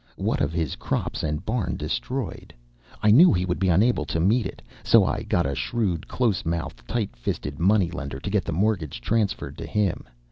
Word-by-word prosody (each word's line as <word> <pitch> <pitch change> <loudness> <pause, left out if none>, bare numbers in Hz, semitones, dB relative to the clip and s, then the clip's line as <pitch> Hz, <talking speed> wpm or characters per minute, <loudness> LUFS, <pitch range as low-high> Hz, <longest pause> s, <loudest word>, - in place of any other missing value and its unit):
What - - -1
of 70 - +1
his 80 -4 -2
crops - - -2
and 75 +3 -3
barn 110 -3 -1
destroyed, 130 - -4 0.5
I 105 - +6
knew 165 - +8
he 90 -1 +1
would 90 -1 -2
be 95 -1 +2
unable 100 +1 +3
to 80 - -2
meet 110 +8 +2
it. - - -10 0.2
So - - +5
I - - -1
got 85 - 0
a 70 - -1
shrewd, 85 - -1
close 115 -7 0
mouthed, 80 -7 -4
tight 115 -4 -2
fisted 70 +4 -4
money 95 0 +3
lender 70 -6 -5
to 85 - -5
get 105 -2 +2
the - - -4
mortgage 90 - 0
transferred 105 - -1
to - - -5
him. 105 -4 0
90 Hz, 200 wpm, -25 LUFS, 80-110 Hz, 0.5 s, knew